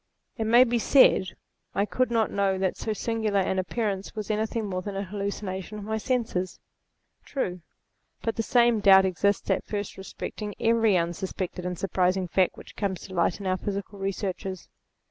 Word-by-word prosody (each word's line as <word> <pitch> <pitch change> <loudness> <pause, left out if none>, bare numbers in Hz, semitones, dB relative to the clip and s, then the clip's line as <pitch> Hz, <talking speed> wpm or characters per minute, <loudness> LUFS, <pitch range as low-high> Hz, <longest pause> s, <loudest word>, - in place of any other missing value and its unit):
It 225 - -2
may 235 +3 +7
be 240 -1 +1
said, 220 -7 +5 0.4
I 200 - +2
could 255 +4 0
not 230 -2 +1
know 195 -1 +1
that 190 -1 0
so 220 - -3
singular 215 -1 0
an 190 0 0
appearance 200 +1 -2
was 215 0 -3
any 215 +1 0
thing 225 0 -3
more 185 -2 -3
than 200 +1 -5
a 195 - -2
hallucination 200 0 -4
of 210 - -7
my 220 +1 -2
senses. 220 -7 -1 0.6
True; 180 -10 -3 0.6
but 225 - -1
the - - 0
same 235 0 +3
doubt 190 -2 +7
exists 195 +2 +1
at - - +1
first 205 -2 -4
respecting 205 +2 -6
every 225 -3 +3
unsuspected 180 +1 -3
and 180 -1 -3
surprising 185 0 +1
fact 185 +1 +1
which - - -12
comes 195 -4 -2
to 190 - -10
light 170 +1 +1
in 200 - -7
our 185 0 +1
physical 200 0 -5
researches. 190 -1 -4
200 Hz, 180 wpm, -27 LUFS, 185-220 Hz, 0.6 s, may